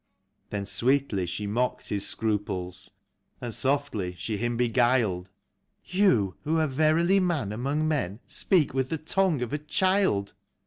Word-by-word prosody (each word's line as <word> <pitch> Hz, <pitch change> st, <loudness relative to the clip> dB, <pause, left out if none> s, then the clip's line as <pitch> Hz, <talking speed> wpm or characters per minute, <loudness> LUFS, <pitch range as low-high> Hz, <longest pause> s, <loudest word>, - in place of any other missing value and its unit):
Then 100 Hz, -1 st, -3 dB
sweetly 120 Hz, -4 st, +1 dB
she 105 Hz, +4 st, -4 dB
mocked 120 Hz, +5 st, -1 dB
his 100 Hz, -1 st, 0 dB
scruples, 95 Hz, -4 st, -2 dB, 0.5 s
and 120 Hz, -2 st, -5 dB
softly 130 Hz, -10 st, -1 dB
she 105 Hz, +4 st, -3 dB
him 120 Hz, +2 st, -1 dB
beguiled: 120 Hz, -6 st, +2 dB, 0.3 s
" -, -, -48 dB, 0.2 s
You, 125 Hz, -, +2 dB
who 160 Hz, +2 st, +1 dB
are 160 Hz, -, +3 dB
verily 155 Hz, +6 st, +3 dB
man 165 Hz, -, 0 dB
among 140 Hz, +8 st, -1 dB
men, 115 Hz, -, -1 dB
speak 175 Hz, -10 st, +1 dB
with 130 Hz, -1 st, 0 dB
the 160 Hz, -, -1 dB
tongue 160 Hz, -2 st, +1 dB
of 120 Hz, -, -5 dB
a 150 Hz, -, 0 dB
child. 155 Hz, -, +1 dB
125 Hz, 145 wpm, -27 LUFS, 100-155 Hz, 0.5 s, are